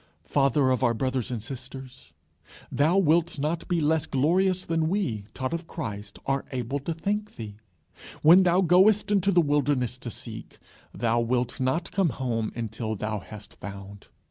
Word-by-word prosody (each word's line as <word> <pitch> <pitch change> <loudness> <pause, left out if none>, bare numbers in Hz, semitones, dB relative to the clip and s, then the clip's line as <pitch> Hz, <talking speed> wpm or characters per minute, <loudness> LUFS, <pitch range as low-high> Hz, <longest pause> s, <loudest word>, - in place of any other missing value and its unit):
Father 140 -1 +2
of 130 - +1
our 120 -2 +3
brothers 130 0 -1
and 120 -4 -4
sisters! 130 +1 -9 0.6
thou 160 +6 +3
wilt 170 -2 +3
not 155 +4 -2
be 175 -2 +1
less 160 +1 +1
glorious 185 +7 +2
than 160 -1 0
we, 160 - -1
taught 130 +1 -3
of 170 0 -4
Christ, 105 -5 -6
are 135 0 0
able 130 +2 -2
to 150 +5 -3
think 210 +5 -3
thee. 105 -2 -8 0.6
When 170 +5 +8
thou 180 0 +3
goest 190 +4 +4
into 200 -1 +3
the 175 -2 +5
wilderness 145 -4 0
to 120 - -6
seek, - - -8 0.3
thou 115 +2 0
wilt 120 +1 -1
not 130 +7 -1
come 195 -4 +2
home 115 -4 -2
until 110 -1 -3
thou 105 +1 -3
hast 105 +2 -11
found. 100 0 -10
135 Hz, 165 wpm, -26 LUFS, 115-170 Hz, 0.6 s, When